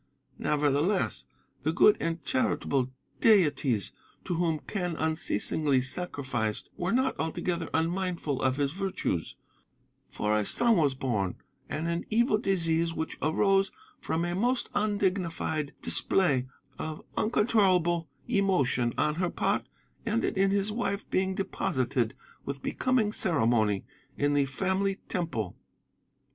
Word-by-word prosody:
Nevertheless, 150 - +1 0.4
the 150 +4 +1
good 205 +5 +6
and 165 -1 -2
charitable 140 - 0 0.3
deities 145 - +3 0.3
to 180 - -1
whom 165 -2 +1
Quen 180 -5 -2
unceasingly 155 -3 +1
sacrificed 130 -6 -2
were 175 +1 -2
not 260 +3 +2
altogether 165 +1 -2
unmindful 170 -3 -1
of 130 -1 +2
his 140 -1 +1
virtues; 185 - -2 0.7
for 105 0 0
a - - +1
son 235 - +3
was 145 -5 +2
born, 105 -9 -1 0.3
and 160 +2 -2
an 170 0 -2
evil 225 -1 +3
disease 165 -4 +1
which 160 - -4
arose 195 +5 +2 0.3
from 165 +1 -1
a 175 - -2
most 240 +7 0
undignified 185 -7 0
display 140 -9 +2 0.3
of 155 -1 -5
uncontrollable 185 - +2 0.2
emotion 180 - +2
on 150 - +2
her 175 +3 0
part - - 0 0.4
ended 225 0 0
in 195 0 +3
his 200 +1 +1
wife 210 -2 -2
being 190 0 +1
deposited 130 - -1 0.3
with 140 0 -5
becoming 250 -5 +1
ceremony 115 - +2 0.3
in 145 0 +2
the 145 -1 +3
Family 190 +7 0
Temple. 140 - -2
165 Hz, 120 wpm, -29 LUFS, 140-195 Hz, 0.7 s, good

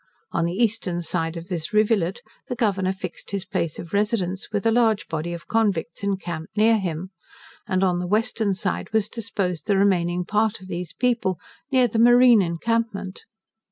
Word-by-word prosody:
On 170 - 0
the 170 +1 -2
eastern 205 -6 0
side 165 -1 -2
of 165 +1 -7
this 175 -1 -4
rivulet 215 0 +2 0.2
the 250 - -3
Governor 195 -5 +1
fixed 190 - -7
his 195 -2 -3
place 175 -5 -2
of 170 - -9
residence, 200 -3 0
with 205 -1 -2
a 225 - +4
large 220 -3 +2
body 160 +1 -3
of 170 -1 -7
convicts 200 -7 0
encamped 185 -2 -4
near 220 +1 +5
him; 180 0 -4 0.6
and 185 0 +1
on 180 -2 +2
the 180 - -3
western 215 0 +1
side 185 0 -3
was 220 -2 +2
disposed 200 -6 -3
the 200 -2 +3
remaining 180 -3 +2
part 215 +2 +1
of 190 0 -13
these 175 -2 -4
people, 235 -7 0 0.3
near 255 -2 +4
the 225 0 -1
marine 240 -1 +7
encampment. 200 +2 -2
195 Hz, 175 wpm, -24 LUFS, 175-220 Hz, 0.6 s, marine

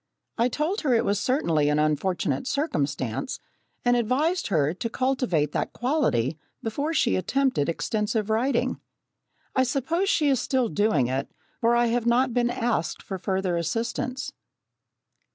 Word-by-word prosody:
I 235 +1 +2
told 315 - -1
her 265 -6 +2
it 230 - +2
was 200 0 +1
certainly 165 - +1
an 150 - +2
unfortunate 165 - 0
circumstance 150 - -2 0.5
and 245 0 +4
advised 275 +10 +1
her 155 -5 +2
to 230 +5 -4
cultivate 245 - 0
that - - -2
quality 165 - 0 0.2
before 280 +8 -2
she 330 - +2
attempted 215 - +1
extensive 210 +4 -1
writing. 245 +5 +1 0.8
I 260 - +4
suppose 285 +9 0
she 315 -7 +3
is 265 -3 +3
still 255 -2 +1
doing 205 - +2
it, 130 +2 -2 0.3
for 235 +1 +3
I 240 0 +4
have 235 0 0
not 245 +1 +3
been 240 0 +2
asked 240 -9 -1
for 190 -2 -5
further 190 -2 -1
assistance. 230 - -2
235 Hz, 145 wpm, -26 LUFS, 170-260 Hz, 0.8 s, and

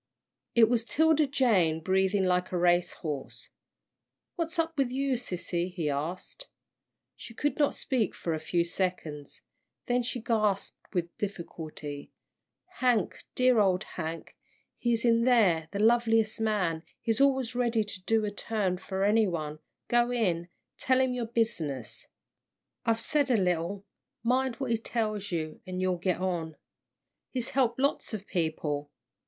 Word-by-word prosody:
It 230 -2 +7
was 235 0 +1
'Tilda 315 +3 +3
Jane, 210 - +3
breathing 190 +3 +2
like 180 0 +1
a 180 - 0
race 175 0 +3
horse. 145 -3 -4 0.9
"What's 335 0 -3
up 325 0 0
with 275 -4 +1
you, 270 +1 0
sissy?" 180 -6 -2
he 165 -5 -1
asked. 175 - -5 0.7
She 230 - -11
could 290 +2 -1
not 290 - +3
speak 255 -6 0
for 165 - -2
a 155 - -2
few 170 +2 +1
seconds, 170 -5 -3 0.4
then 245 0 +2
she 245 +1 -3
gasped 215 -4 0 0.2
with 170 -3 -2
difficulty, 160 -7 -6 0.7
"Hank, 245 -6 +1
dear 255 -2 +4
old 190 -3 +3
Hank, 165 -1 -6 0.4
he's 235 -1 0
in 230 -1 +4
there 200 -11 +4
the 200 - -5
loveliest 225 0 +3
man 190 -7 +1 0.2
he's 225 +3 0
always 265 -3 +3
ready 235 -3 +1
to 205 -3 -6
do 220 +3 +1
a 205 - -2
turn 205 -3 -1
for 190 0 -3
any 215 +1 +4
one 155 -4 -4 0.3
go 240 0 +3
in 180 -8 0 0.3
tell 260 0 +3
him 260 -1 +2
your 240 -2 -2
business. 165 - -2 0.8
I've 225 0 +3
said 285 +3 +1
a 245 - +4
little, 180 +1 0 0.4
mind 255 +1 +1
what 260 -1 -3
he 230 - +3
tells 215 -3 -2
you, 155 -2 -3
an' 185 0 -4
you'll 185 -1 +1
get 180 0 0
on. 170 -4 -2 0.7
He's 250 -3 -3
helped 245 -3 +2
lots 275 -4 0
of 205 -2 -7
people. 150 -5 -2
210 Hz, 150 wpm, -29 LUFS, 175-240 Hz, 0.9 s, It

